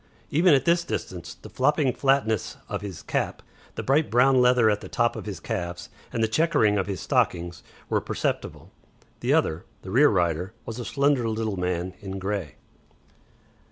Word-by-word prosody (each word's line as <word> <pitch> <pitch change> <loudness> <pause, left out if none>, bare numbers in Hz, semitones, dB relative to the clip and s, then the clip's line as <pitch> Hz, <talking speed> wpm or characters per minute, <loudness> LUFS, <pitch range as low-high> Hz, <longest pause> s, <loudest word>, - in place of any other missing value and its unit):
Even 165 +1 +5
at 135 0 +1
this 170 0 +3
distance 90 - -5
the - - -13
flopping 140 0 +2
flatness 130 -5 +1
of - - -4
his 100 -4 -7
cap, - - -2 0.3
the - - -4
bright 145 +4 +2
brown 125 +2 +4
leather 125 -2 +5
at 105 -1 +2
the - - -9
top 120 -1 +1
of - - -7
his 95 -5 -5
calves, 90 -3 -4 0.2
and 115 - -1
the - - +3
chequering 110 -6 +2
of 95 - -1
his 95 -3 -3
stockings 85 0 0 0.3
were - - +1
perceptible. - - -3 0.5
The - - +1
other, 80 +3 0 0.2
the 95 - -7
rear 140 +7 +6
rider, 90 0 0
was 115 +1 -6
a 120 - -5
slender 140 -4 +1
little 110 -2 -2
man 90 0 -2
in 95 -1 -6
grey. 95 -6 -3
110 Hz, 175 wpm, -25 LUFS, 95-135 Hz, 0.5 s, rear